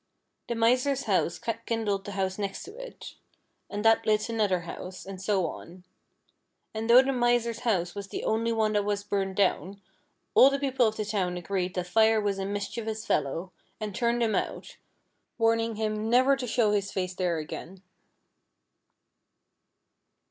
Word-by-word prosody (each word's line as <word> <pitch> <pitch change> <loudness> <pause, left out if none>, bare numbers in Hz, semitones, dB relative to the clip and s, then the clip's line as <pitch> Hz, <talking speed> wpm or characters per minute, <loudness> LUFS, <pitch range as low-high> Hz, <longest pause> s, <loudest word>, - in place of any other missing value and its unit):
The 235 - -2
Miser's 255 +4 +2
house 185 -5 0 0.3
kindled 210 -4 -1
the 205 - -6
house 190 0 -2
next 200 -1 -4
it, - - -9 0.6
and 205 +1 -4
that 225 0 +5
lit 215 +1 +1
another 210 -6 +1
house, 180 +2 -8
and 190 -1 -8
so 195 -2 +1
on; 175 +2 -8 0.9
and 220 +1 -4
though 250 +2 +9
the 270 0 0
Miser's 240 -2 +1
house 180 -8 0
was 200 -1 -6
the - - -5
only 230 +1 0
one 220 -1 +1
that 205 -1 +2
was 205 0 -1
burned 195 -2 -2
down, 195 0 0 0.5
all 265 - +8
the 275 - 0
people 265 -3 +2
of 220 - -3
the 215 - -2
town 190 -4 -1
agreed 185 +1 -2
that 180 -1 -1
Fire 220 +4 +4
was 200 -2 -1
a 195 - -2
mischievous 215 +2 -4
fellow, 160 +6 -1 0.3
and 215 -2 -4
turned 235 +2 +1
him 220 -2 +1
out, - - -3 0.6
warning 225 0 +2
him 215 0 -2
never 260 +3 +5
to 260 -2 -5
show 225 -2 +2
his 200 -1 0
face 185 -1 -2
there 180 -2 -1
again. 175 +4 -7
210 Hz, 165 wpm, -28 LUFS, 190-230 Hz, 0.9 s, though